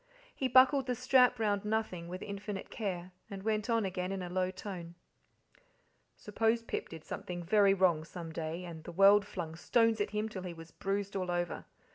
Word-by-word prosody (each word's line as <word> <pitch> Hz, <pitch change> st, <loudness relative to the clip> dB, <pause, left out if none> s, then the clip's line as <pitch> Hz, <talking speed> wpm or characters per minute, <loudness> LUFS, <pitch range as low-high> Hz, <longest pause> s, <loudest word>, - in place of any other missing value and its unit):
He 265 Hz, -, -1 dB
buckled 260 Hz, +2 st, +5 dB
the 250 Hz, -, 0 dB
strap 255 Hz, 0 st, +4 dB
round 205 Hz, -2 st, 0 dB
nothing 210 Hz, -5 st, -2 dB
with 180 Hz, +2 st, -6 dB
infinite 200 Hz, -1 st, -6 dB
care, 185 Hz, -4 st, -4 dB, 0.2 s
and 195 Hz, -1 st, -7 dB
went 215 Hz, +1 st, -1 dB
on 230 Hz, -2 st, +2 dB
again 185 Hz, 0 st, -3 dB
in 195 Hz, -1 st, -3 dB
a 175 Hz, -, -5 dB
low 185 Hz, 0 st, +1 dB
tone: 185 Hz, -3 st, -7 dB, 1.2 s
"Suppose 225 Hz, +2 st, 0 dB
Pip -, -, -4 dB
did 165 Hz, -2 st, -10 dB
something 175 Hz, -1 st, -5 dB
very 200 Hz, +2 st, +4 dB
wrong 175 Hz, -5 st, +3 dB
some 165 Hz, 0 st, -8 dB
day, 165 Hz, +2 st, -4 dB
and 165 Hz, -2 st, -8 dB
the -, -, -7 dB
world 200 Hz, +3 st, +6 dB
flung 165 Hz, -5 st, -5 dB
stones 225 Hz, +4 st, +2 dB
at 205 Hz, -, 0 dB
him 210 Hz, +1 st, -1 dB
till 205 Hz, -4 st, -6 dB
he 180 Hz, -2 st, -6 dB
was 165 Hz, -1 st, -11 dB
bruised 200 Hz, +2 st, -3 dB
all 185 Hz, -2 st, -2 dB
over. 175 Hz, -1 st, -2 dB
195 Hz, 190 wpm, -32 LUFS, 175-215 Hz, 1.2 s, world